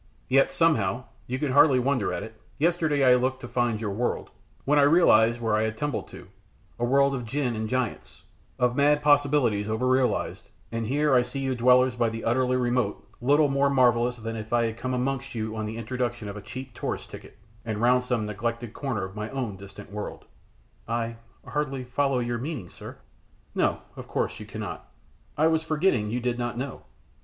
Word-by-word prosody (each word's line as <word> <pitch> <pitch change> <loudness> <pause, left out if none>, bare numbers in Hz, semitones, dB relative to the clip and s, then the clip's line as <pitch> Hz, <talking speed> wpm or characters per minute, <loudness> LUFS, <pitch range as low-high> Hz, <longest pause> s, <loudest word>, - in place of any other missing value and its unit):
Yet, 135 +1 +4
somehow 125 - +2 0.2
you 130 - -2
can 140 0 -1
hardly 140 0 +6
wonder 125 -5 +1
at 90 - -3
it 110 0 -11 0.2
yesterday 155 -2 +2
I 130 -1 +7
looked 130 +1 +1
to 120 - -6
find 120 -3 0
your 105 -2 -3
world, 120 +5 -2 0.3
when 145 +1 +4
I - - +6
realised 120 -7 +5
where 115 -2 +1
I 110 - +2
had 110 0 -2
tumbled 145 +3 -2
to, - - -12 0.5
a - - -2
world 140 +3 +3
of 125 -2 -3
djin 125 0 -1
and 110 0 -3
giants; 130 -1 -3 0.3
of 125 0 +1
mad 145 +1 +3
possibilities 140 -8 +3
over 110 +4 0
realised, 130 0 0 0.2
and 115 -1 -2
here 145 +3 +2
I 125 - +6
see 135 +3 -5
you 135 -1 0
dwellers 125 +1 +4
by 120 -1 +1
the 115 0 -6
utterly 125 +2 +2
remote 120 -4 -1
little 145 +4 +4
more 140 0 +2
marvellous 125 -2 +3
than 115 -1 -6
if 110 0 -7
I 120 -1 +3
had 115 0 -3
come 130 +1 -2
amongst 135 +1 -2
you 110 -1 -3
on 110 -1 -3
the 110 +1 -5
introduction 120 -1 -3
of 100 - -6
a 105 - -7
cheap 130 +5 -8
tourist - - -5
ticket, - - -11 0.3
and 110 -2 -3
round 125 +2 +4
some 125 -3 -1
neglected 115 +2 -3
corner 125 -9 -3
of 95 +1 -7
my 105 +1 -4
own 120 -6 -3
distant 100 0 -12
world!" 105 0 -6 0.6
"I 115 0 -2 0.3
hardly 135 -3 -2
follow 135 +2 0
your 120 -1 -1
meaning, 130 - -5
sir." - - -10 0.6
"No, - - +2
no, - - -14
of - - -9
course - - -2
you - - -9
cannot. - - -7 0.5
I 155 - +3
was 160 0 +3
forgetting 155 - +1
you 120 +3 -1
did 125 0 -2
not 120 -1 -3
know! 135 +2 -5
125 Hz, 200 wpm, -26 LUFS, 115-135 Hz, 0.6 s, I